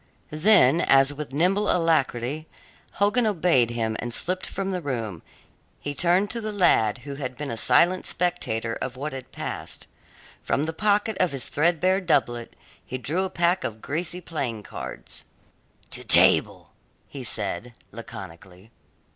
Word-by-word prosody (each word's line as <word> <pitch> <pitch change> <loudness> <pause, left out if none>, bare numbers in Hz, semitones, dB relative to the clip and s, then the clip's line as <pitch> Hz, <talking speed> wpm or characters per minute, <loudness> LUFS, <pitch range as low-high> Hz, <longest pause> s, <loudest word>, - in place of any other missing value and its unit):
Then, 165 -3 +5
as 135 -1 +4
with 145 -1 -7
nimble 185 +8 +2
alacrity 155 -3 0 0.5
Hogan 215 +4 +2
obeyed 165 - +2
him 115 -2 -2
and 120 - -4
slipped 185 +9 -1
from 195 0 -3
the 180 -1 -3
room, 115 - -4 0.6
he 145 - -4
turned 180 +6 +2
to 235 - -3
the 215 0 -3
lad, 170 - +3
who 140 - -5
had 130 -2 -5
been 145 -2 -5
a - - -3
silent 175 +10 +3
spectator 115 -11 -2
of 125 0 -4
what 145 +2 -4
had 130 -1 -8
passed. - - -6 0.6
From 145 - 0
the 160 - -3
pocket 210 +3 +1
of 180 -5 +1
his 135 -3 -3
threadbare 175 +5 +2
doublet 120 -9 0 0.3
he 130 - -5
drew 165 +9 -2
a - - -4
pack 175 0 +1
of 110 -1 -4
greasy 170 +7 -3
playing 130 -11 -4
cards. - - -8 0.7
"To - - -5
table," - - +4 0.4
he 135 -2 -8
said 110 0 +1 0.2
laconically. 90 +5 -11
150 Hz, 150 wpm, -25 LUFS, 120-180 Hz, 0.7 s, Then